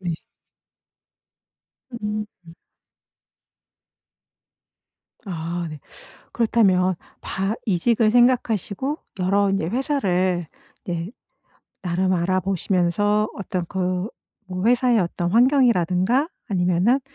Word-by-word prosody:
네. 175 -3 -2 1.9
음. 210 0 -2 3.0
아 170 -1 -3
네. 150 -2 -9 0.5
그렇다면 195 -6 +3 0.3
바 195 +3 -2
이직을 215 +4 +2
생각하시고 245 - +1 0.2
여러 195 +2 +2
인제 195 -4 0
회사를 185 - 0 0.4
네 170 +2 -3 0.7
나름 185 +1 0
알아보시면서 185 +3 +1
어떤 185 -3 -3
그 185 +2 -2 0.4
뭐 185 +2 -3
회사의 245 -1 +4
어떤 175 -1 -1
환경이라든가 235 - +3 0.2
아니면은 185 +6 +2
190 Hz, 180 characters per minute, -23 LUFS, 180-225 Hz, 3.0 s, 회사의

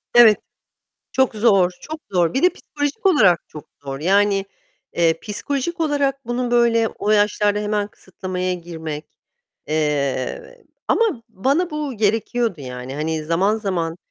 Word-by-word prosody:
Evet. 225 -3 +8 0.8
Çok 265 -3 +2
zor, 200 -5 +4
çok 310 0 -7
zor. 175 -1 +1
Bir 265 - +1
de 360 - +7
psikolojik 290 +8 -4
olarak 210 - +5
çok 150 - -10 0.2
zor. 135 0 -6
Yani, 195 +3 +3 0.5
eee, 165 -1 +2
psikolojik 280 - -3
olarak 280 -4 0
bunun 240 0 -1
böyle 230 -2 +3
o 210 - -3
yaşlarda 210 0 +3
hemen 210 0 -1
kısıtlamaya 185 -1 -4
girmek 160 -3 -6 0.6
Eee, 145 -4 -2 0.2
ama 415 - +2
bana 275 - 0
bu 300 -4 -4
gerekiyordu, 220 -2 0
yani. 125 0 -7
Hani, 155 +1 -2
zaman 185 +7 +2
zaman, 175 -6 -2
205 Hz, 130 wpm, -21 LUFS, 165-245 Hz, 0.8 s, Evet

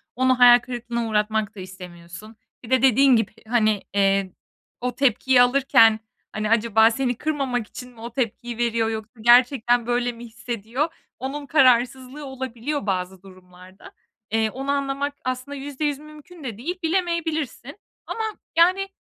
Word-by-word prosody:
Onu 255 0 +2
hayal 245 0 +8
kırıklığına 240 -1 -4
uğratmak 215 0 -1
da 195 - -10
istemiyorsun. 180 +2 -11 0.3
Bir 230 - -11
de 260 -2 +3
dediğin 265 0 +5
gibi, 225 -2 0 0.2
hani, 215 -3 +2
eee, 195 -1 +1 0.5
o 250 -1 -3
tepkiyi 260 -1 +3
alırken, 245 -4 +4 0.3
hani, 215 0 -3
acaba 225 0 +4
seni 245 0 -1
kırmamak 270 -7 -2
için 250 0 -11
mi 230 - -18
o 235 0 -8
tepkiyi 240 -1 -3
veriyor 230 -1 0
yoksa 220 +1 -7
gerçekten 240 0 +4
böyle 245 0 0
mi 235 0 -11
hissediyor? 235 +6 -4 0.3
Onun 280 +3 -5
kararsızlığı 260 0 +2
olabiliyor 265 0 -5
bazı 185 -1 -3
durumlarda. 185 0 -16 0.4
Eee, 220 0 +1
onu 270 +5 -4
anlamak 280 0 -2
aslında 255 +2 -4
%100 285 +1 -3
mümkün 305 +2 -14
de 230 -5 -6
değil. 350 +9 -5
Bilemeyebilirsin. 325 - -2 0.3
Ama, 445 - -4 0.3
yani, 370 +3 +4
245 Hz, 140 wpm, -23 LUFS, 220-275 Hz, 0.5 s, hayal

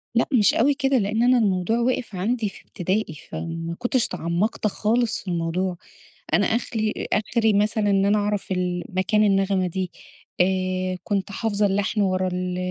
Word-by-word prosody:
لأ 235 - +4
مش 215 -5 +5
أوي 275 +5 +3
كده، 270 -1 +1
لأن 220 +1 +1
أنا 250 +1 +5
الموضوع 200 0 +1
وقف 240 -3 -1
عندي 215 +4 -1
في 195 - -14
ابتدائي، 185 -1 -2 0.2
فما 165 0 -5
كنتش 245 0 +1
تعمقت 175 +7 -1
خالص 225 +2 0
في - - -19
الموضوع. 175 +2 -1 0.6
أنا - - +4
أخلي 220 -2 -1
آخري 220 +1 +2
مثلًا 210 +1 +2
إن 195 -1 +3
أنا 205 +1 +3
أعرف 205 -1 -2
ال 180 -1 -1
مكان 200 +3 +1
النغمة 195 -2 +2
دي، 185 +1 -3 0.5
آآ 185 0 0
كنت 200 -1 -2
حافظة 210 0 0
اللحن 205 +2 0
ورا 185 -1 +1
ال 180 0 -2
200 Hz, 160 wpm, -23 LUFS, 185-220 Hz, 0.6 s, مش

